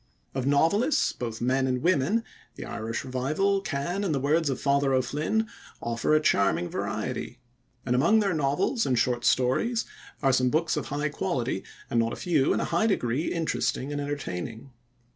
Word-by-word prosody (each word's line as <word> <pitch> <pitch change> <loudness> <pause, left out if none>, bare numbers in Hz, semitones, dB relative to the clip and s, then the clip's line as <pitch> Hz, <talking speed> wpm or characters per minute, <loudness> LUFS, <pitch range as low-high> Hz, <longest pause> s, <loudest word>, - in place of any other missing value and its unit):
Of 130 0 -2
novelists, 200 - +3
both 115 -2 -5
men 130 +2 +2
and 125 0 -1
women, 185 +6 +2 0.3
the - - -7
Irish 115 +1 -4
Revival 155 +11 0
can, 175 +4 -2
in 180 -6 0
the 140 - 0
words 150 +3 +2
of 135 - -2
"Father 140 -1 +2
O'Flynn", 150 - 0 0.3
offer 115 +6 0
a - - +5
charming 100 - +2
variety, - - -3 0.5
and 125 -1 +1
among 170 +12 +4
their 200 -3 +1
novels 155 - +1
and 125 - +2
short 120 +1 +1
stories 220 - +2 0.4
are 135 -1 +4
some 125 0 +3
books 160 +5 +1
of 145 -7 -3
high 145 +4 -1
quality 135 - -2 0.2
and 120 - +1
not 115 0 +1
a - - -3
few 155 -7 +1
in - - +1
a - - 0
high 175 +6 +1
degree 140 - 0
interesting 160 -4 -1
and 145 0 -2
entertaining. 130 -4 -5
140 Hz, 175 wpm, -27 LUFS, 125-170 Hz, 0.5 s, a